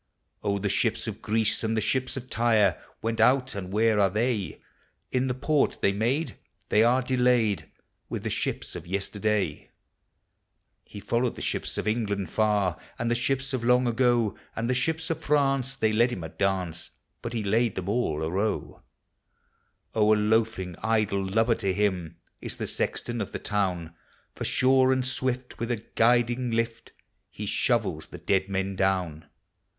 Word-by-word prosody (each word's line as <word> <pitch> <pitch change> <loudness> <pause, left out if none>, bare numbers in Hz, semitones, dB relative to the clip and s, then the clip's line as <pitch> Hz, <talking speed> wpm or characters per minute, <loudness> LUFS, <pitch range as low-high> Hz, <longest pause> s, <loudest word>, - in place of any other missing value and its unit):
Oh, 100 -1 0
the 100 +1 -1
ships - - 0
of - - -6
Greece 110 0 0
and 110 0 0
the - - +4
ships 130 +5 -1
of 130 -1 -6
Tyre 110 -7 +2 0.2
Went 115 0 0
out, 130 0 +4
and 95 -2 -6
where 110 +1 +3
are 100 -1 +4
the.\? 105 -3 -1 0.5
In 130 0 +1
the 125 - -1
port 145 +2 +1
they 100 - +4
made, 120 +10 -1 0.3
they 105 - +4
are 125 +3 +4
delayed 125 -5 +2 0.4
With - - -4
the - - -2
shi{>s - - -3
of 85 - -7
yesterday. 100 -2 -1 1.2
He 105 - -10
followed 120 +4 0
the - - -8
ships - - -3
of - - -2
England 100 -5 -1
far. 105 -5 +1 0.2
As 115 - -1
the - - +3
ships 135 +3 -1
of 125 -3 -1
long 125 +1 +4
ago; 120 -3 +2 0.2
And 115 - -2
the 125 - +2
ships 160 +6 -1
of 160 - -2
Franc.. 135 -4 +2
tlu 135 -4 -1
N 110 - -1
led 120 +1 +5
hini 90 -9 -5
a - - -6
dance, 90 -3 -2 0.3
lint 120 - -4
he 110 - -1
laid 110 +2 +1
them 95 -1 -4
all 100 -9 0
arow. 95 +7 -2 1.1
Oh, 110 -1 +4
a - - 0
loafing, 105 -4 +1
idle 110 -3 +1
lubber 110 +5 +2
to 95 -1 0
him 95 -5 -1 0.2
Is - - -5
the - - -3
sexton 120 -1 -2
of 100 - -5
the - - -1
town; 90 -5 -2 0.4
For - - -5
sure 130 0 +4
and 130 -1 +1
swift, 130 -1 -2
will) 115 +1 -2
a - - +2
guiding 120 +2 +2
lift, 115 0 -2 0.5
Ho - - -4
shovels 75 0 0
the - - -9
dead 95 0 0
men 95 0 -1
down. 90 -5 0
110 Hz, 175 wpm, -27 LUFS, 100-125 Hz, 1.2 s, led